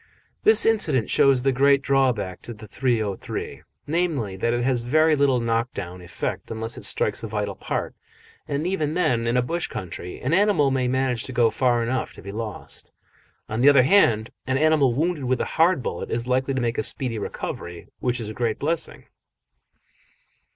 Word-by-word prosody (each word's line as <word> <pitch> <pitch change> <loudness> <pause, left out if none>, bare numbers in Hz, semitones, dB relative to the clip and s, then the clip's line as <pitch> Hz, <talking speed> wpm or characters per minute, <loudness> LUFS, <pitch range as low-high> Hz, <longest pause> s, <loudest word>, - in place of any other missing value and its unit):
This 435 - +5
incident 155 - +2
shows 135 -3 +4
the 135 - +3
great 140 +1 +3
drawback 125 -9 +1
to 120 - -8
the 110 0 -11
.303 110 -3 -2 0.2
namely, 150 - -1
that 115 +5 0
it 120 0 0
has 125 -1 +1
very 155 +6 +3
little 140 -3 +2
knock 115 +1 0
down 90 -2 -6
effect 90 +1 -5
unless 115 +1 -4
it - - -5
strikes - - 0
a - - -5
vital - - -3
part; - - -4 0.5
and 145 +2 -2
even 160 -5 -1
then, 120 -10 +1
in 120 +2 +1
a 125 - +3
bush 170 +7 -2
country, 90 0 -7
an 130 +6 -1
animal 190 -7 +3
may 130 -1 0
manage 130 -2 0
to - - -6
go 120 -3 +3
far 120 -2 +1
enough 125 +3 -2
to - - -12
be 100 - -7
lost. 110 -1 -6 0.6
On 110 +2 -2
the 140 - +7
other 140 -3 +6
hand, 120 - +3 0.2
an 130 0 +1
animal 155 -3 +3
wounded 155 +2 -1
with 130 0 0
a - - 0 0.2
hard 165 -5 +4
bullet - - -4
is 115 +1 -2
likely 130 +2 0
to 130 - 0
make 120 0 -1
a - - +3
speedy 115 0 -2
recovery, 85 -3 -6
which 125 -1 -1
is 110 - -5
a 110 - -6
great 115 -1 -1
blessing. 160 +3 -3
125 Hz, 190 wpm, -24 LUFS, 115-140 Hz, 0.6 s, the